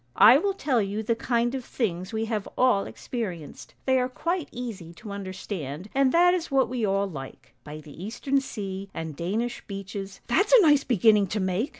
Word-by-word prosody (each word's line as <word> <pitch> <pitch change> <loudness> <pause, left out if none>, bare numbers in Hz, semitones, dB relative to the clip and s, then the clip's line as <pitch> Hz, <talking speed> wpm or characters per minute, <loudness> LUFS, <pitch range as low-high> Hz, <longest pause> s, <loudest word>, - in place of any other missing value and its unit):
I 245 +6 +8
will 395 +3 0
tell 265 - +1
you 205 +2 -2
the 230 +2 +1
kind 235 +1 0
of 265 -2 -3
things 185 -6 -3
we 220 0 -1
have 220 -3 -3
all 250 -6 +3
experienced; 185 - -6
they 260 -1 +3
are 250 0 0
quite 335 +5 -2
easy 210 -9 -7
to 210 +3 -9
understand, 185 -4 -6
and 270 -1 +3
that 355 +3 +5
is 345 -2 -2
what 270 -2 +2
we 250 -2 -2
all 195 -1 +1
like: 135 -8 -9
By 150 +1 -8
the 150 +3 -11
eastern 270 +6 0
sea 195 -6 -6
and 160 -2 -5
Danish 215 +10 -2
beeches 195 -1 -6
— - - -41
' - - -34
"'That's 390 - +2
a - - +9
nice 295 -4 +5
beginning 215 -3 +4
to 210 +4 -2
make!' 190 +7 0
220 Hz, 205 wpm, -26 LUFS, 190-255 Hz, -, a